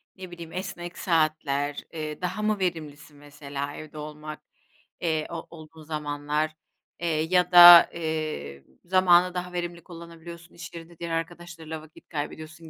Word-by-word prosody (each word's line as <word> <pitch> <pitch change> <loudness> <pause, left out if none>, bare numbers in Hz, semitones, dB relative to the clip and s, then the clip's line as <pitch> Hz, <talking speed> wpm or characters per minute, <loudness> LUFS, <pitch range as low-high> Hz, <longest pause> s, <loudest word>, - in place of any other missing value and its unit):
ne 185 -2 -10
bileyim, 170 -2 -9
esnek 180 -2 -6
saatler, 155 -4 0
eee, 155 0 -5
daha 180 +4 -3
mı 215 -1 0
verimlisin? 155 -5 -4
Mesela 145 0 -7
evde 155 0 -10
olmak, 150 0 -8 0.6
eee, 160 -3 0
o 170 - -6
o 165 - -9
olduğun 160 0 -13
zamanlar, 150 0 -2 0.5
eee, 170 - -2
ya 170 +3 +1
da, 175 -1 +11
eee, 155 - -4 0.2
zamanı 180 0 +4
daha 180 0 -5
verimli 175 -1 -4
kullanabiliyorsun 170 0 -11
i̇ş 170 -1 -10
yerinde 170 0 -11
diğer 170 -1 -5
arkadaşlarıyla 165 -1 -5
vakit 155 0 -18
kaybediyorsun 155 +1 -6
165 Hz, 140 wpm, -26 LUFS, 155-175 Hz, 0.6 s, da